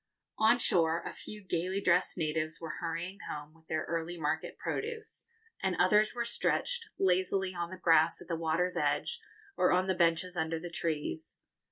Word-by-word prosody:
On 220 +2 +6
shore, 170 -7 +3
a - - -4
few 210 -1 -8
gaily 185 +1 -1
dressed 180 -1 +2
natives 155 0 -1
were 160 -3 -5
hurrying 175 +4 -4
home 150 0 -6
with 160 0 -24
their 155 0 -1
early 170 +1 -3
market 150 -2 -2
produce, 450 0 -4 0.3
and - - +1
others 215 +2 +4
were 235 -1 -1
stretched 460 - 0
lazily 190 0 +2
on 170 -1 -3
the 185 - -7
grass 165 -2 +4
at 175 - -12
the 170 - -1
water's 165 +3 0
edge 470 -1 0 0.3
or 180 - +3
on 180 +1 +3
the 190 - +1
benches 170 +1 +2
under 160 -1 -1
the 175 +1 -7
trees. 155 - -3
175 Hz, 175 wpm, -32 LUFS, 160-190 Hz, 0.3 s, On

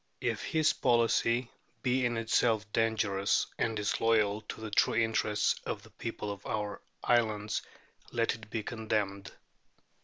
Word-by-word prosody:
If - - -1
his 155 -1 +2
policy 120 0 +2 0.3
be 125 -1 +2
in 120 -1 -2
itself 115 -1 +2
dangerous 105 -3 +2
and 115 - +1
disloyal 105 0 +2
to - - -5
the 110 -1 -6
true 105 - +3
interests 110 -2 +1
of - - -4
the - - -16
people 105 - -5
of 100 0 -8
our 105 -1 -3 0.2
islands, 110 -3 +1 0.5
let 115 -1 +1
it 110 -1 -11
be 110 -1 -3
condemned. 105 -4 -2
110 Hz, 135 wpm, -31 LUFS, 105-115 Hz, 0.5 s, true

